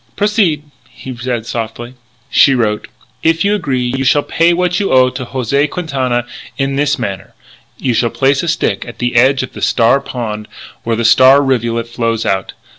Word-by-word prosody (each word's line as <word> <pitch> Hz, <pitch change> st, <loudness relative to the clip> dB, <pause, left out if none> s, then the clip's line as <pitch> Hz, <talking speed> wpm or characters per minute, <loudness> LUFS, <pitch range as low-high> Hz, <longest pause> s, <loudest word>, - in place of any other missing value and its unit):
"Proceed," 205 Hz, -8 st, +1 dB, 0.3 s
he 130 Hz, -1 st, -9 dB
said 120 Hz, -1 st, -3 dB
softly. 115 Hz, +1 st, -5 dB, 0.4 s
She 135 Hz, -, +5 dB
wrote: 105 Hz, -4 st, -1 dB, 0.3 s
"If 165 Hz, +2 st, +1 dB
you 205 Hz, -, +2 dB
agree 140 Hz, -11 st, -1 dB
you 130 Hz, +2 st, -2 dB
shall 145 Hz, +2 st, +3 dB
pay 165 Hz, +1 st, +2 dB
what 180 Hz, 0 st, 0 dB
you 200 Hz, -, -1 dB
owe 130 Hz, -1 st, +4 dB
to 130 Hz, 0 st, -6 dB
José 135 Hz, +4 st, 0 dB
Quintana 130 Hz, -8 st, -2 dB, 0.3 s
in 135 Hz, 0 st, -1 dB
this 145 Hz, +1 st, +1 dB
manner: 95 Hz, -2 st, -5 dB, 0.4 s
you 125 Hz, -, -1 dB
shall 120 Hz, +1 st, +1 dB
place 135 Hz, +3 st, +1 dB
a 170 Hz, -, -4 dB
stick 165 Hz, -, -1 dB
at 120 Hz, -, -10 dB
the 120 Hz, 0 st, -2 dB
edge 130 Hz, +3 st, +4 dB
of 130 Hz, -, -8 dB
the -, -, -9 dB
Star 120 Hz, +3 st, +3 dB
Pond 110 Hz, -5 st, -5 dB, 0.4 s
where 115 Hz, 0 st, -1 dB
the 115 Hz, +1 st, -1 dB
Star 130 Hz, +4 st, +6 dB
rivulet 115 Hz, -3 st, -1 dB
flows 115 Hz, -1 st, -2 dB
out. 95 Hz, -1 st, -1 dB
130 Hz, 185 wpm, -15 LUFS, 120-145 Hz, 0.4 s, Star